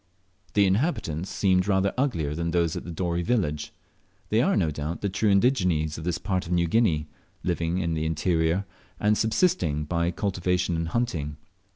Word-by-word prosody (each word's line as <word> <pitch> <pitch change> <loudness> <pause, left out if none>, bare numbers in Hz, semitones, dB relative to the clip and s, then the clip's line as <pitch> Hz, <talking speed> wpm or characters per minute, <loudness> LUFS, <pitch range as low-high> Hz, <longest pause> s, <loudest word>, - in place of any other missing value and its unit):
The 100 -1 +5
inhabitants 95 - 0
seemed 95 -1 +2
rather 95 -1 +2
uglier 85 - 0
than 85 +2 -2
those 85 -1 +1
at 85 -2 -6
Dorey 85 0 -1
village. 85 -9 -1 0.6
They - - +3
are, - - +2
no 80 - +1
doubt, 75 +3 -4
the 100 - 0
true 100 +3 +1
indigenes 90 - +2
of 80 - -7
this 85 -1 0
part 95 -4 -2
of - - -6
New 85 -1 +3
Guinea, 85 -5 +2 0.4
living 85 -1 -1
in 85 -3 -1
the 80 0 -1
interior, 80 +3 +1 0.3
and 105 +1 +3
subsisting 100 - +1
by 85 +1 0
cultivation 90 -1 0
and 80 0 -1
hunting. 80 -9 -2
90 Hz, 170 wpm, -26 LUFS, 80-100 Hz, 0.6 s, The